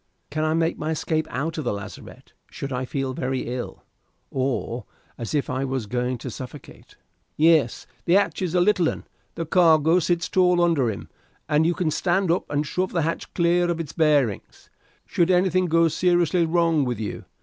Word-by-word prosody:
"Can 155 +1 -1
I 155 0 +1
make 165 0 0
my 155 - -3
escape 160 0 -1
out 155 +5 -3
of - - -3
the 120 - -1
lazarette 100 -2 -10 0.2
should 140 -1 -6
I 125 +1 -2
feel 135 0 -3
very 130 0 -2
ill, 125 -1 -6 0.5
or 130 -3 -2 0.3
as 115 +5 -4
if 145 - 0
I 130 +1 -2
was 130 -4 -2
going 125 +3 -2
to 125 +2 -7
suffocate?" 130 +2 -11 0.4
"Yes, 155 -6 +3 0.2
the 170 - +2
hatch 195 -5 +1
is 180 -2 -1
a 180 - +4
little 180 -3 +3
un. - - -6 0.3
The 165 - -3
cargo 160 0 +4
sits 175 0 0
tall 180 -1 +3
under 165 -8 +2
him, 105 - -6 0.4
and 155 +1 +3
you 175 - +1
can 165 -4 0
stand 180 +2 +1
up 175 - -1
and 145 +1 0
shove 185 +6 -2
the 170 -3 +1
hatch 165 +2 -3
clear 175 0 +2
of 170 -1 -1
its 160 -2 -5
bearings 145 - 0 0.3
should 170 0 +1
anything 185 0 +3
go 165 0 +4
seriously 175 0 +2
wrong 165 -2 +2
with 120 -4 -2
you. 105 - -5
160 Hz, 190 wpm, -24 LUFS, 135-175 Hz, 0.5 s, a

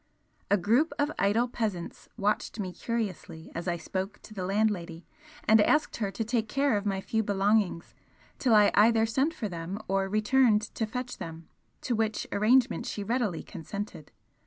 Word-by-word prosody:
A 205 - +4
group 235 - +2
of 290 +1 +1
idle 220 +5 +2
peasants 215 -8 -4
watched 210 +2 -1
me 185 -3 -3
curiously 195 -9 -4
as 170 +2 -5
I 175 -1 0
spoke 190 +4 -4
to 215 - -12
the 190 -3 -4
landlady 190 -5 -1 0.4
and 220 0 +6
asked 300 +8 +2
her 205 -4 -1
to 225 - -3
take 225 -1 -1
care 275 -2 +2
of 205 0 -1
my 195 -1 -1
few 220 +3 0
belongings 200 -3 +1 0.5
till 240 -4 +4
I 210 -1 +6
either 225 +1 +5
sent 265 +8 +1
for 230 -9 -4
them 175 +1 -5
or 195 0 0
returned 215 +1 +3
to 220 - -2
fetch 250 +2 -5
them, 165 -1 -8 0.3
to 250 - -1
which 220 -1 0
arrangement 235 +4 +3
she 205 - -4
readily 220 -5 -1
consented. 180 -2 -7
210 Hz, 170 wpm, -28 LUFS, 190-230 Hz, 0.5 s, and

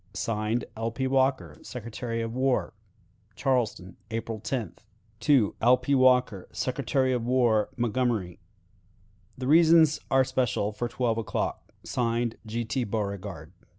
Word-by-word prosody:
(Signed) 110 +1 -1
"L. 115 +1 -2
P. 130 +4 -3
Walker, 130 0 +1
Secretary 115 -1 -5
of 115 0 -4
War." 130 +1 0 0.6
"Charleston, 115 -8 -1
April 115 -1 -4
10th. 110 -11 -4 0.8
"L. 125 +2 +6
P. 140 - -1
Walker, 125 -7 +3
Secretary 130 0 0
of 120 -2 -1
War, 120 -4 +2
Montgomery. 120 -6 -1 1.0
"The 130 - -5
reasons 160 +1 +5
are 135 0 +4
special 125 -5 0
for 115 +3 -3
twelve 120 -1 -1
o'clock. 110 - -3
(Signed) 115 -1 -1
"G. 115 +2 -3
T. 120 +4 -1
Beauregard." 100 -7 -4
120 Hz, 120 wpm, -27 LUFS, 110-130 Hz, 1.0 s, L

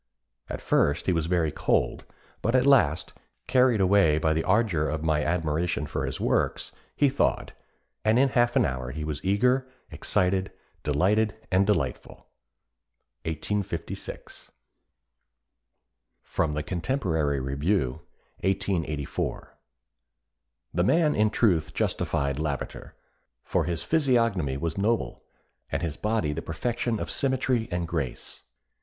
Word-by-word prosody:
At - - -5
first 75 +4 +2
he 95 - +2
was 80 -1 0
very 85 -3 +1
cold, - - 0 0.4
but 115 +3 +1
at 130 0 +4
last, 105 - +3 0.3
carried 125 -3 +4
away 95 -5 +4
by 80 0 +2
the 80 +1 0
ardour 95 -7 +2
of 80 0 -3
my 75 -2 +1
admiration 85 -1 0
for 75 - -3
his - - -4
works, - - 0 0.2
he 145 - +4
thawed, 135 0 0 0.5
and 110 +2 +3
in 135 +1 +4
half 120 -1 +2
an - - +4
hour 65 -2 -3
he 75 +4 -5
was 75 -2 -4
eager, 125 +7 +2 0.2
excited, 95 +1 0 0.3
delighted 100 +9 +2 0.2
and 95 +1 +3
delightful." 80 -12 -2 1.0
1856. 85 +2 -5 1.7
[Sidenote: 75 -1 -1
The 75 - -2
Contemporary 85 - -1
Review, 70 +2 -1 0.4
1884.] 85 -6 -2 1.2
"The 85 +3 +2
man 155 - +3
in 105 0 +3
truth 90 -8 +1
justified 70 0 -1
Lavater, 75 -3 -4 0.5
for - - 0
his 85 -2 -2
physiognomy 115 - +2
was 80 +5 -3
noble, 115 +3 0 0.5
and - - -1
his 80 -3 -2
body 105 -5 0
the - - -4
perfection 115 +7 -2
of - - -4
symmetry 130 -4 0
and 85 -1 -2
grace. 80 -7 -4
90 Hz, 125 wpm, -27 LUFS, 75-110 Hz, 1.7 s, at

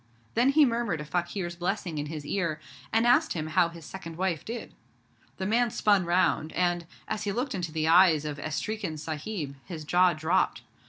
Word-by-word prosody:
Then 240 +4 +4
he 295 +1 +6
murmured 230 - 0
a 150 - -5
fakir's 175 +2 -2
blessing 175 -2 -2
in 145 - -3
his 150 -1 -6
ear, 170 -3 -1 0.3
and 225 +1 +3
asked 255 +7 +4
him 155 -3 -3
how 155 +2 +2
his 165 -2 -11
second 165 -4 -8
wife 175 -5 -1
did. 235 +2 -6 0.6
The 190 - -3
man 235 +4 +2
spun 205 -4 +2
round, 170 -2 +2
and, 175 -2 0 0.2
as 210 - -3
he 205 - 0
looked 250 +6 -2
into 175 -4 -3
the 155 0 -1
eyes 165 -3 +6
of 150 -1 -4
'Estreekin 165 +3 -3
Sahib', 155 -1 -5
his 165 -5 -7
jaw 180 +3 +4
dropped. 160 +4 0
175 Hz, 190 wpm, -28 LUFS, 155-205 Hz, 0.6 s, he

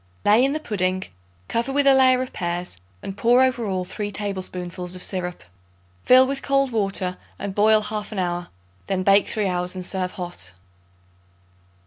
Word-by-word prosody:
Lay 215 +4 +5
in 275 +1 +2
the 310 - -2
pudding; 185 -8 -1 0.4
cover 235 +3 -1
with 285 +1 +2
a 275 - +7
layer 255 -1 +5
of 255 - -9
pears 175 - -3 0.3
and 195 - -6
pour 240 +4 +4
over 250 -4 +1
all 185 -2 -2
3 205 +3 -4
tablespoonfuls 185 -3 -3
of 180 - -2
syrup. 180 -2 -3 0.6
Fill 255 +1 +7
with 270 +1 -3
cold 275 -1 +2
water 195 -4 -1 0.2
and 200 -1 -5
boil 215 +2 +4
half 210 0 -4
an 215 - -6
hour; 175 -1 -2 0.4
then 190 -1 -1
bake 195 +1 +4
three 215 -3 -1
hours 180 0 0
and 185 -1 -3
serve 185 -1 -2
hot. 175 - -6
200 Hz, 170 wpm, -23 LUFS, 180-240 Hz, 0.6 s, a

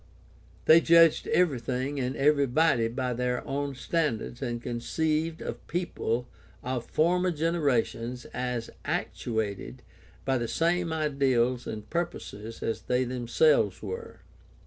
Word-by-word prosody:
They 160 +1 +8
judged 165 -1 +5
evecything 135 -3 0
and 130 +1 -1
every 140 0 +3
body 130 -3 +3
by 125 +2 -2
their 125 +1 -1
own 140 0 -2
standards 125 -5 -2
and 120 -3 -2
conceived 155 +7 -1
of - - -6
people 125 -8 -2 0.4
of 125 -2 -3
former 180 +3 +2
generations 140 -7 0
as 125 -2 -3
actuated 110 +1 -3 0.4
by 135 -2 +1
the 120 - -2
same 170 +4 +1
ideals 135 -6 +1
and 105 -1 -6
pur 170 +1 0
poses 110 -9 -9
as 115 - -2
they 125 +1 +1
themselves 120 - +2
were. 95 -3 -6
130 Hz, 125 wpm, -28 LUFS, 120-160 Hz, 0.4 s, They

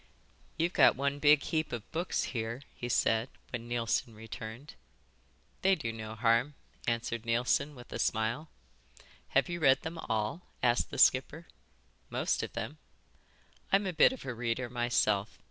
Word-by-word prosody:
"You've 170 +2 +1
got - - +6
one 140 +1 -1
big 150 0 +5
heap 160 -1 -1
of 115 -3 -6
books 170 +3 -1
here," 115 +2 -3
he 120 - -5
said, 115 +1 +2 0.2
when 120 -1 -5
Neilson 115 -1 -1
returned. 110 +4 -8 0.9
"They 190 0 +4
do 115 -9 -4
no 110 -1 -7
harm," 115 +5 +2 0.3
answered 115 -1 -1
Neilson 125 +5 +1
with 120 -1 -11
a - - -4
smile. 115 +8 0 0.9
"Have - - +4
you 175 0 -4
read 135 -4 +4
them 165 +1 -5
all?" 110 +9 -1 0.2
asked 120 -1 +3
the - - -6
skipper. 145 +5 +3 0.6
"Most - - 0
of - - -5
them." - - -5 0.9
"I'm 200 +1 +4
a 185 - -2
bit 160 - +6
of 260 - -8
a 130 - -3
reader 115 +1 -2
myself. 110 -4 +1
120 Hz, 155 wpm, -31 LUFS, 115-150 Hz, 0.9 s, got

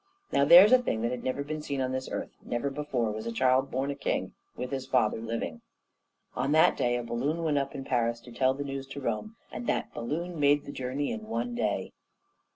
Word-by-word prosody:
Now, 140 - +3
there's 175 - +9
a 255 - +8
thing 115 - -1
that 120 - 0
had 125 - -4
never 130 +2 -1
been 155 +1 -4
seen 140 -2 -3
on 130 -1 0
this 130 0 -3
earth; - - -4
never 120 +4 -2
before 135 -6 -1
was 110 +2 -5
a - - -2
child 130 +3 +2
born 135 +2 -1
a - - -4
king - - -2 0.2
with 125 +2 -4
his 135 -1 -3
father 115 -4 +2
living. 115 -8 -4 0.7
On 135 +4 0
that 160 - +5
day 120 0 +1
a 120 - -3
balloon 135 +8 -2
went 150 -3 +2
up 140 0 -4
in 135 - -5
Paris 120 -2 0
to 120 - -13
tell 130 +2 +2
the 145 - -4
news 135 -1 -5
to 135 +1 -7
Rome, 130 - -3 0.2
and 240 - -6
that - - -1
balloon 165 +7 -4
made 145 0 +4
the - - -6
journey 135 +2 -2
in 225 -2 -6
one 240 +2 -2
day. 240 - -1
135 Hz, 230 wpm, -29 LUFS, 120-145 Hz, 0.7 s, there's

